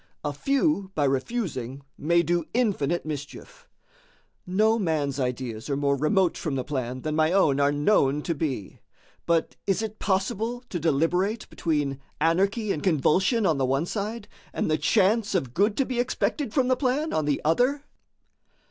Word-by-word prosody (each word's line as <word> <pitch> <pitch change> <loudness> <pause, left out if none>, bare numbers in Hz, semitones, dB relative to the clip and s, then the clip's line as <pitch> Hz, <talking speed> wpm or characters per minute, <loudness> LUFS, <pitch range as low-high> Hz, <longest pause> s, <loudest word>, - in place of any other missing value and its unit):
A 145 -1 -2
few 270 - 0
by 150 - +1
refusing 135 - -2
may 170 +3 +2
do 170 -1 0
infinite 175 - 0
mischief. 155 - -8 0.8
No 215 +5 +2
man's 150 -7 -1
ideas 125 -2 -3
are 140 - 0
more 140 0 +1
remote 170 +6 +2
from 150 -4 -2
the 130 - -1
plan 130 -3 -4
than 155 +2 -2
my 155 +1 +3
own 155 -8 +3
are 140 0 +3
known 145 -2 +2
to 170 - -1
be; 140 - -4 0.5
but 170 -1 +1
is 195 +2 +1
it 215 0 -6
possible 220 +5 -1
to 175 - -3
deliberate 175 +8 +1
between 145 -5 -1 0.2
anarchy 195 +7 +1
and 150 - -2
convulsion 190 - +2
on 155 -6 +2
the 135 - +2
one 135 +5 +1
side, 210 +3 -4 0.3
and - - -1
the 155 - +3
chance 210 0 +2
of 130 -9 -1
good 205 - +2
to 270 - +2
be 250 -2 -3
expected 255 +1 -1
from 260 0 +2
the 255 - +3
plan 280 +4 0
on 155 - 0
the 145 -1 +1
other?" 250 - +2
170 Hz, 165 wpm, -26 LUFS, 145-215 Hz, 0.8 s, my